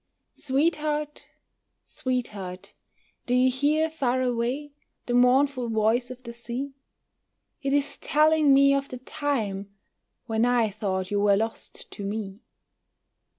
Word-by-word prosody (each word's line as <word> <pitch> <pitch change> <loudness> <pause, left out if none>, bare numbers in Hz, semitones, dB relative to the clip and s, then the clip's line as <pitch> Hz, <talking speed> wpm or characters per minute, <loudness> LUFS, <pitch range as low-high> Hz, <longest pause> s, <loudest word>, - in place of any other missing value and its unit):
Sweetheart, 300 +1 -1 0.6
sweetheart, 205 -8 -4 0.5
do 250 - +2
you 255 +1 +4
hear 295 +5 +2
far 260 -5 0
away 250 +4 -1 0.3
The 245 - -2
mournful 250 0 +3
voice 225 +3 +1
of 255 0 -10
the 235 -1 -8
sea? 240 +4 -5 0.9
It 275 -1 -1
is 285 0 +1
telling 305 -1 +3
me 275 0 +6
of 275 0 -1
the 255 - -6
time 225 -7 -3 0.6
When 225 -1 0
I 240 -3 +2
thought 190 -2 -3
you 205 - +1
were 200 -1 +4
lost 225 +2 -5
to 205 - -7
me. 200 -1 -4
250 Hz, 125 wpm, -26 LUFS, 220-280 Hz, 0.9 s, me